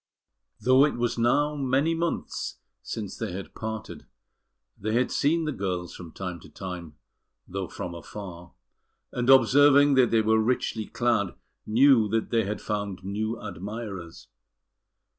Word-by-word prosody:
Though 130 +2 +5
it 150 - +2
was 120 -1 -1
now 145 +6 +2
many 140 +3 +1
months 170 +1 -3 0.2
since 105 -4 -5
they 110 -6 -4
had 95 +1 -7
parted, 110 -1 -6 0.7
they 110 +2 -3
had 125 +1 +2
seen 160 +3 +2
the 155 - -1
girls 90 - -3
from 85 -3 -10
time 90 -1 -5
to 90 - -14
time, 90 -5 -7 0.5
though 95 0 -4
from 85 - -6
afar; 85 0 -9 0.6
and 125 +1 -1
observing 140 +2 +6
that 130 -3 +5
they 115 -1 +3
were 110 0 +3
richly 110 -1 -1
clad, 115 -6 0 0.3
knew 120 0 +5
that 110 +1 -1
they 115 -3 +2
had 105 +2 -3
found 100 -3 -3
new 110 +4 -3
admirers. 100 -2 -7
110 Hz, 140 wpm, -27 LUFS, 95-130 Hz, 0.7 s, observing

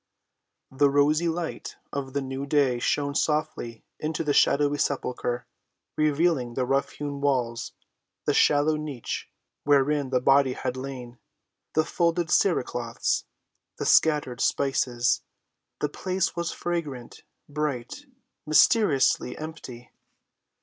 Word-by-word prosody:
The 140 +2 +3
rosy 150 +4 +3
light 165 0 -4 0.2
of 135 -2 -4
the 140 -1 -1
new 135 +1 -5
day 140 -4 +2
shone 140 +3 0
softly 150 -7 -2
into 155 +1 -2
the 150 -2 +1
shadowy 145 +1 +3
sepulchre, 125 -3 -2 0.5
revealing 150 -5 +1
the 130 - 0
rough‐hewn 140 +2 -2
walls, 125 -5 -1 0.5
the - - +2
shallow 150 +1 +3
niche 150 -6 -5 0.3
wherein 145 0 +2
the 130 -1 +2
body 135 0 +4
had 125 - -3
lain, 130 -2 -7 0.6
the 155 - +3
folded 170 -1 0
cere‐cloths, 120 -10 0 0.5
the - - -3
scattered 145 -6 +3
spices. 125 -3 +1 0.6
The 150 - 0
place 185 +4 -2
was 170 0 -2
fragrant, 150 -9 -4 0.3
bright, 150 - -4 0.4
mysteriously 155 - +3
empty. 150 -6 -9
140 Hz, 110 wpm, -26 LUFS, 130-155 Hz, 0.6 s, body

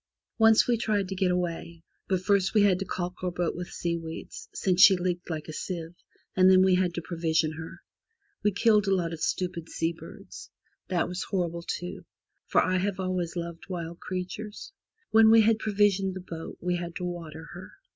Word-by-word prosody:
Once 225 0 +6
we 240 -1 +2
tried 210 -4 0
to 190 - -4
get 190 -1 +1
away, 170 -2 -3 0.2
but 185 -2 0
first 195 +1 +2
we 210 - +6
had 190 -3 +4
to 195 - -3
caulk 180 0 -5
our 180 - +1
boat 175 -1 -2
with 180 +1 -5
seaweeds, 165 -1 -5
since 185 -1 +1
she 195 - +9
leaked 180 0 -2
like 155 -2 -4
a 155 - -6
sieve, 170 -1 -5 0.4
and 185 0 +6
then 185 0 +7
we 190 -1 +4
had 180 -1 +2
to 170 - -4
provision 160 -1 0
her. 160 +1 -9 0.6
We 210 - +2
killed 210 0 +3
a 195 - +3
lot 170 -2 -1
of 160 - -7
stupid 175 -3 -2
sea 165 +1 -1
birds. 165 - -11 0.4
That 180 -3 0
was 180 0 -4
horrible, 170 -3 -2
too, 180 +2 -5 0.4
for - - +4
I 185 0 +1
have 195 +1 -1
always 185 -2 -2
loved 170 +1 -6
wild 170 -2 -5
creatures. 195 - -6 0.4
When 220 0 +7
we 225 0 +8
had 220 0 +3
provisioned 200 -3 +1
the 185 - -6
boat 165 -1 -7
we 180 0 -1
had 170 0 -6
to - - -5
water 165 -2 -7
her. 180 +1 -10
180 Hz, 195 wpm, -27 LUFS, 170-195 Hz, 0.6 s, she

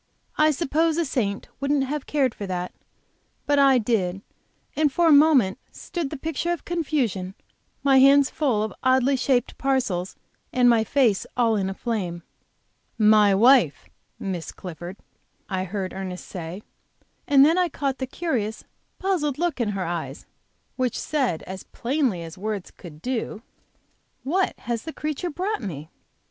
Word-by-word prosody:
I 305 0 +4
suppose 315 +2 +1
a 340 - +1
saint 215 -8 -2
wouldn't 280 0 +1
have 285 +1 -4
cared 270 -5 +1
for 200 - -6
that, 180 -1 -4 0.7
but 290 0 +3
I 275 -2 +6
did, 200 -5 0 0.5
and 300 -2 +2
for 345 +5 +2
a - - +6
moment 285 -10 +5
stood 340 -6 -5
the 300 - -6
picture 320 +4 -2
of 345 - -4
confusion, 260 - -1 0.5
my 270 -1 +5
hands 275 +1 +6
full 250 -9 +1
of 220 - -4
oddly 260 +1 +3
shaped 255 -1 0
parcels 240 -10 0 0.4
and 250 -1 +3
my 230 -2 +5
face 230 -4 +2
all 230 -2 +3
in 195 -2 0
a 190 - -5
flame. 185 -8 -3 0.7
"My 210 -2 +5
wife, 230 - +4 0.3
Miss 180 -4 -4
Clifford," 175 +1 -8 0.5
I 190 -1 -2
heard 190 0 -4
Ernest 185 -1 -6
say, 180 +3 -7 0.6
and 280 -1 +7
then 330 +4 +3
I 360 -1 +2
caught 275 -3 -2
the 260 - -2
curious, 245 -8 -2 0.3
puzzled 340 -8 0
look 330 -6 -1
in 225 - 0
her 195 -2 -2
eyes, 170 0 -5 0.5
which 255 -3 0
said 260 - -1
as 190 0 -8
plainly 245 - -1
as 165 +2 -10
words 205 -2 -4
could 160 -4 -13
do: 235 -3 -3 0.8
"What 365 +8 0
has 235 -2 -2
the 320 +4 -7
creature 305 +4 -3
brought 370 +6 -2
me?" 160 -7 -6
250 Hz, 155 wpm, -24 LUFS, 195-290 Hz, 0.8 s, and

